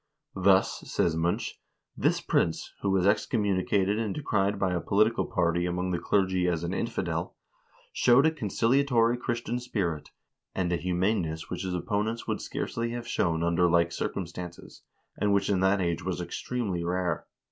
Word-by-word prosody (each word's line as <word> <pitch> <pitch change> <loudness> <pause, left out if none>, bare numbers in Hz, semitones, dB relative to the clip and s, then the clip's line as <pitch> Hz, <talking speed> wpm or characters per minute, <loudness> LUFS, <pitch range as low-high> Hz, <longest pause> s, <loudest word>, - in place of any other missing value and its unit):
"Thus," 95 0 +3
says 80 - +1
Munch, 85 +2 -1 0.4
"this - - +1
prince, 80 - 0
who 100 - 0
was 95 -1 +2
excommunicated 100 -1 +1
and 110 -3 -2
decried 100 -8 0
by 95 -2 0
a 85 - -1
political 110 +3 +2
party 85 -4 +1
among 90 +1 -1
the 90 - 0
clergy 95 0 +1
as 85 -2 0
an 85 +2 -2
infidel, - - -2 0.6
showed 125 +4 +5
a 160 - +4
conciliatory 120 -1 +2
Christian 120 -1 -2
spirit, 95 -11 -3 0.5
and 90 -2 0
a - - +2
humaneness 90 -2 -1
which - - -3
his 95 -2 -2
opponents 105 +6 -2
would - - -2
scarcely 115 0 -3
have 120 -1 -5
shown 85 -7 0
under 85 +1 +3
like 85 0 +3
circumstances, 85 0 -6 0.4
and 105 -1 +2
which 100 0 +1
in 95 - +2
that 95 +2 +3
age 85 -1 -1
was 95 0 -2
extremely 90 +1 -3
rare. 90 -1 -1
95 Hz, 160 wpm, -28 LUFS, 85-110 Hz, 0.6 s, showed